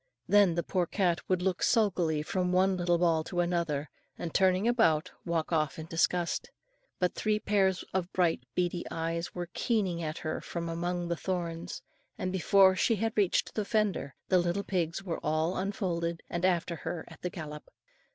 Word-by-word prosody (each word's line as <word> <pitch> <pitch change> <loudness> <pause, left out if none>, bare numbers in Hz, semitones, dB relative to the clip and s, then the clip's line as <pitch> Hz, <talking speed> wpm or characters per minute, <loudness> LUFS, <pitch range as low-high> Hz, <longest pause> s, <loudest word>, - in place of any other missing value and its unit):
Then 200 -5 +5
the 170 - 0
poor 180 -2 0
cat 175 -3 +1
would 185 -1 +1
look 185 -2 0
sulkily 175 -9 +2
from 180 +2 -1
one 190 +1 +3
little 175 -1 +2
ball 165 -2 +2
to 175 - -3
another, 170 -4 0 0.3
and 165 - -5
turning 190 +2 +3
about, 220 -11 +3 0.2
walk 165 -1 -1
off 155 -3 +1
in 160 - -6
disgust. 170 +1 0 0.5
But 180 -1 +1
three 215 -1 +1
pairs 195 -3 +1
of 185 -1 -1
bright 175 -7 +2
beady 175 -1 0
eyes 165 +1 -3
were 175 -1 -5
keeking 195 -8 0
at 155 -1 -3
her 155 - -3
from 170 -1 -4
among 175 +1 -2
the 170 - 0
thorns; 170 -2 -4 0.3
and 185 - -2
before 190 +1 +5
she 225 +4 +2
had 225 +2 -1
reached 200 -4 +2
the 215 - -1
fender, 205 - 0
the 185 - +4
little 175 +3 0
pigs 180 -2 -1
were 175 -4 -3
all 160 +3 +1
unfolded 175 -4 -2
and 175 +1 0
after 175 -2 +1
her 165 0 -5
at - - -14
the 180 - -2
galop. 150 -4 -8
175 Hz, 180 wpm, -30 LUFS, 165-190 Hz, 0.5 s, Then